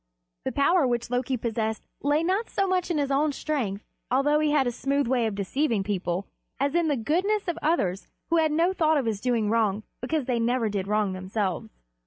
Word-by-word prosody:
The - - 0
power 285 +1 +3
which 240 0 -2
Loki 250 +1 0
possessed 220 -1 -2 0.2
lay 295 +3 +2
not 385 +6 0
so 390 - 0
much 370 -1 0
in 340 - 0
his 280 -1 0
own 290 +2 +2
strength, 235 -11 -2 0.2
although 280 +4 +3
he 305 0 +2
had 295 -2 +3
a 245 - 0
smooth 275 +4 0
way 240 -1 +1
of 215 - -3
deceiving 220 +2 0
people, 190 -2 -2 0.3
as 280 +1 +1
in 340 -1 +2
the 290 -3 +1
goodness 370 - 0
of 340 -1 -2
others 200 - 0 0.2
who 335 - +4
had 315 -1 +3
no 335 +4 +2
thought 315 -3 +3
of 275 - 0
his 215 -3 -2
doing 230 -4 +1
wrong 215 -2 +1 0.2
because 290 +2 -1
they 245 -2 0
never 235 -1 +1
did 200 -2 -2
wrong 210 -2 +1
themselves. 185 0 -3
255 Hz, 210 wpm, -26 LUFS, 220-310 Hz, 0.3 s, who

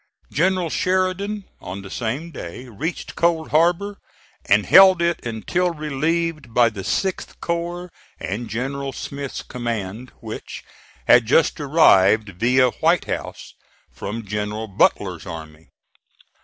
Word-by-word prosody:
General 180 0 +1
Sheridan, 185 +2 0
on 95 +2 -7
the 95 - -10
same 130 +9 -3
day, 125 - -8
reached 140 - -5
Cold 170 -2 +1
Harbor, 175 +6 +2 0.5
and - - +3
held 190 -2 +8
it 170 -1 0
until 170 +10 -1
relieved 155 -2 -2
by 120 -1 +5
the 100 -3 -7
6th 190 - -2
corps 175 +1 -3 0.3
and 110 +4 -4
General 135 +5 -3
Smith's 140 0 -6
command, 115 -1 -5
which 110 -1 -8 0.4
had 120 -2 +6
just 160 +6 +3
arrived, 110 - +4
via 125 +2 +4
White - - +3
House, - - -5 0.4
from 115 +2 -6
General 105 +2 -3
Butler's 100 - +1
army. 80 -1 -9
135 Hz, 120 wpm, -22 LUFS, 110-170 Hz, 0.5 s, held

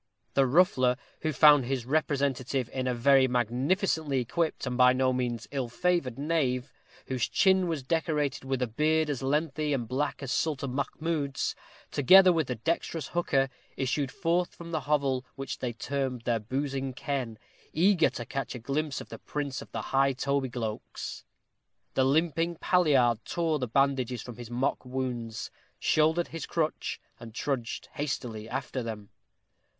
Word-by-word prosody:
The 135 -1 +4
ruffler, 130 -5 +4 0.2
who 155 - -1
found 145 -1 +6
his 130 -2 -2
representative 135 -3 0
in 130 -1 -2
a 125 - +1
very 130 +2 +5
magnificently 135 - +1
equipped, 155 +7 -1
and 125 -1 -2
by 125 0 +6
no 130 0 +2
means 120 -2 -2
ill 135 -4 -2
favored 155 -3 0
knave, 140 -4 0 0.3
whose 130 -3 -1
chin 190 -2 +4
was 160 -5 -2
decorated 150 -2 0
with 135 -1 -1
a - - 0
beard 155 +6 +1
as 135 - -3
lengthy 150 +2 0
and 125 - -2
as - - -11
black 140 +4 -2
as 135 - -4
Sultan 140 -5 -1
Mahmoud's, 145 0 -2 0.4
together 185 +6 +7
with 160 -5 0
the 125 - -2
dexterous 160 +3 -2
hooker, 140 -6 +1 0.3
issued 135 +1 -1
forth 175 -1 0
from 170 0 -9
the 160 - 0
hovel 140 -4 +2
which 135 -1 -5
they 125 - -2
termed 130 +1 -3
their 120 -1 +1
boozing 135 +3 -3
ken, 130 -4 -3 0.3
eager 175 +1 +4
to 120 - -6
catch 135 +1 -4
a - - -3
glimpse 140 +5 -2
of - - -11
the - - -8
prince 140 -2 -4
of - - -12
the - - -3
high 135 0 +4
tobygloaks. 130 -5 -3 0.7
The 130 - +3
limping 165 +4 +1
palliard 140 -11 +3
tore 165 -3 0
the 125 - -2
bandages 130 -2 +1
from 120 -3 -9
his 120 -2 -8
mock 125 +4 -1
wounds, 125 -3 -4 0.3
shouldered 160 +2 +2
his 165 -2 -6
crutch, 160 -2 -1 0.2
and 115 -1 -11
trudged 125 -5 -3
hastily 120 -7 -4
after 130 +1 -3
them. 110 -3 -6
135 Hz, 160 wpm, -29 LUFS, 125-155 Hz, 0.7 s, together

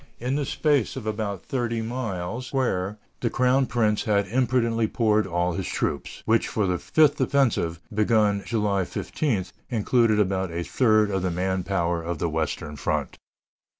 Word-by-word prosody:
In 130 +4 -1
a 145 - -1
space 145 -3 +1
about 105 -6 -3
thirty 120 -3 -1
miles 115 -1 -4
square 105 -7 -1 0.2
the 120 - 0
crown 130 +2 +2
prince 110 -3 +1
had 100 -2 +2
imprudently 115 -2 +1
poured 110 -3 +2
all 85 0 0
his 95 +1 -3
troops, 70 - -3
which, 115 +1 +2
for 105 - 0
the 90 -2 0
fifth 150 -2 +3
offensive, 115 - +1
begun 105 -1 +2
July 105 -4 0
15, 110 - -2 0.2
included 115 -1 +2
about 95 -2 +1
a 85 +1 -3
third 110 -1 +3
of 95 -1 0
the 90 - 0
man 95 +2 -1
power 85 -3 -1
of 85 0 -3
the 85 - -1
western 80 -1 -3
front. - - -2
105 Hz, 155 wpm, -25 LUFS, 95-120 Hz, 0.2 s, fifth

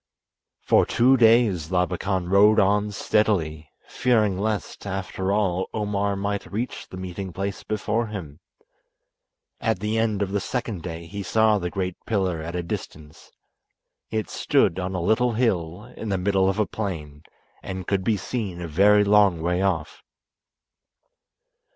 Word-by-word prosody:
For - - +4
two 125 +3 +4
days 110 -9 +4
Labakan 90 0 0
rode 105 +3 +5
on 105 +1 +2
steadily, 85 -8 0 0.2
fearing 110 -6 +1
lest, 105 +1 -3
after 95 0 -3
all, 95 -3 0
Omar 100 -1 -1
might 100 +1 -3
reach 115 +5 -4
the 95 - -10
meeting 95 +1 -6
place 100 +2 -4
before 110 +2 -1
him. 85 -8 -7 1.2
At 115 -3 0
the 105 +2 -1
end 110 -3 +1
of 95 - -4
the 100 - 0
second 115 -3 -3
day 85 0 -6
he 100 +4 -6
saw 110 +2 +3
the 90 -1 -3
great 90 -1 -4
pillar 95 -7 0
at 85 +2 -6
a 90 - -2
distance. 75 -2 -8 0.8
It 110 -1 -2
stood 85 - +2
on 95 +1 -3
a 90 - -1
little 120 +6 +2
hill 105 -2 -1
in 110 - -6
the 95 - 0
middle 95 0 +2
of 95 - -1
a 105 - +2
plain, 80 -9 -5 0.4
and 95 -1 -6
could 95 0 0
be 110 +1 +1
seen 100 -3 -4
a 85 - -5
very 100 +6 +5
long 100 -4 +4
way 90 +3 0
off. 85 -6 -1
100 Hz, 150 wpm, -24 LUFS, 90-105 Hz, 1.2 s, rode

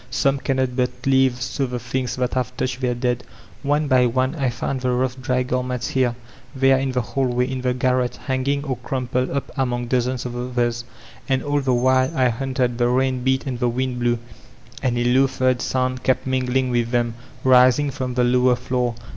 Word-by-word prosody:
Some 135 +2 +1
cannot 130 -1 -1
but 125 -1 +1 0.2
leave 130 -2 +3
so 135 +1 -2
the 125 0 -4
things 125 +1 -3
that 125 0 -1
have 125 0 -2
touched 130 0 -2
their 125 -1 0
dead 125 0 -1 0.4
One 145 +1 +1
by 130 -2 +4
one 130 +2 0
I 140 -6 0
found 125 +2 -3
the 130 - 0
"rough 125 +1 -1
dry*' 125 0 0
garments, 125 -1 -2
here, 125 -2 +1 0.4
there, 135 0 +4
in 135 -1 -1
the 125 - +1
hall 135 +2 -1
way, 125 0 +1
in 130 -1 -4
the 125 0 0
garret, 125 -1 +1
hanging 140 +1 0
or 135 -4 -3
crumpled 125 0 -2
up 140 0 -3
among 120 -3 -1
dozens 125 0 0
of 120 -1 -5
others. 120 -1 -1 0.4
And 130 -1 +1
all 145 0 0
the 130 -2 +1
while 130 +2 +3
I 130 -1 +4
hunted, 125 0 -1
the 120 - +3
rain 130 0 +1
beat 130 0 +1
and 125 -3 -3
the 120 -1 +1
wind 125 +1 -2
blew, 120 0 +1 0.6
and 125 -3 0
a 120 - +1
low 130 +3 +4
third 130 -1 0
sound 130 0 -1
kept 130 0 +1
mingling 130 0 0
with 120 -1 +1
them, 120 -1 0 0.3
rising 130 +2 +5
from 130 -2 -4
the 125 - +2
lower 125 0 +4
floor. 125 -1 -1
125 Hz, 205 wpm, -22 LUFS, 125-130 Hz, 0.6 s, rising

